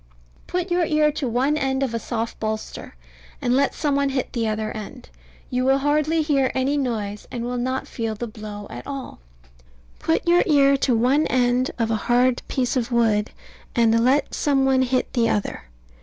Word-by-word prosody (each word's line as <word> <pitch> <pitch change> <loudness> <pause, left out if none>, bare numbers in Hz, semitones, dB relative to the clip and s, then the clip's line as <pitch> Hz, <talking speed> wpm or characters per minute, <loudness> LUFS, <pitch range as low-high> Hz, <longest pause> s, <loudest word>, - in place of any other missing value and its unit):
Put 360 0 -2
your 350 0 +2
ear 305 -1 +3
to 290 -2 -3
one 260 +6 +1
end 270 -1 0
of 255 -4 -2
a 230 - -1
soft 230 +1 -4
bolster, 215 - -5 0.4
and 245 0 +1
let 275 +1 +2
some 290 -3 0
one 280 0 +1
hit 265 -2 -2
the 230 -2 0
other 215 0 -2
end. 240 +4 -8 0.4
You 250 0 0
will 270 +1 +4
hear - - -5
hardly 305 +2 +2 0.3
any 265 +2 +1
noise, 215 -7 -3
and 235 - -5
will 245 0 -2
not 260 +2 -2
feel 225 -2 -3
the 240 - -4
blow 210 -2 -8
at - - -8
all. 275 -2 -6 0.8
Put 165 - 0
your 345 +1 +5
ear 280 -3 +5
to 260 -2 +1
one 265 +7 +3
end 250 0 +2
of 225 -2 0
a - - +2
hard 245 +1 +3
piece 250 -1 -1
of 245 -1 -1
wood, 225 -3 +2 0.5
and 230 -1 +3
let 270 +4 +2
some 275 -2 +1
one 265 -1 +3
hit 255 0 0
the 230 -2 +2
other. 205 - -2
250 Hz, 190 wpm, -23 LUFS, 230-275 Hz, 0.8 s, your